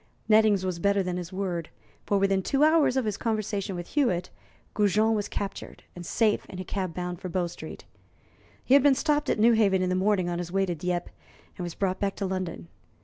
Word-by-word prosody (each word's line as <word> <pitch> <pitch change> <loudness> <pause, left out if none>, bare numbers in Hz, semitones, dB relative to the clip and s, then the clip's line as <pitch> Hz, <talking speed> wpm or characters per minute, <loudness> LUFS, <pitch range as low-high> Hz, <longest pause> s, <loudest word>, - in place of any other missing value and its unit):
Nettings 215 -3 +4
was 180 -2 -2
better 200 +2 +2
than 180 -1 -3
his 175 0 -6
word, 180 -4 -3 0.4
for 205 - +2
within 195 0 +2
two 275 +9 +1
hours 310 -4 +4
of 260 - +1
his 210 -2 -2
conversation 210 -3 -2
with 175 -1 -6
Hewitt, 185 - 0 0.4
Goujon 210 +2 +2
was 210 -2 -1
captured 200 -1 -6
and 175 - -8
safe 215 +5 +1
in 185 - -8
a 185 - -4
cab 185 -1 -4
bound 180 -1 -4
for 185 - -5
Bow 180 0 0
Street. 170 - -9 0.8
He 255 - +3
had 280 - +8
been 280 0 +5
stopped 295 +1 0
at - - +1
Newhaven 215 -4 +4
in 180 - 0
the - - +1
morning 190 -1 +1
on 175 0 -2
his 175 -1 -5
way 195 +1 +2
to 180 - -2
Dieppe, 175 +2 -3 0.4
and 180 - -6
was 175 -2 -5
brought 190 -1 -1
back 200 -1 -1
to 200 - -3
London. 185 - -4
195 Hz, 215 wpm, -27 LUFS, 180-215 Hz, 0.8 s, had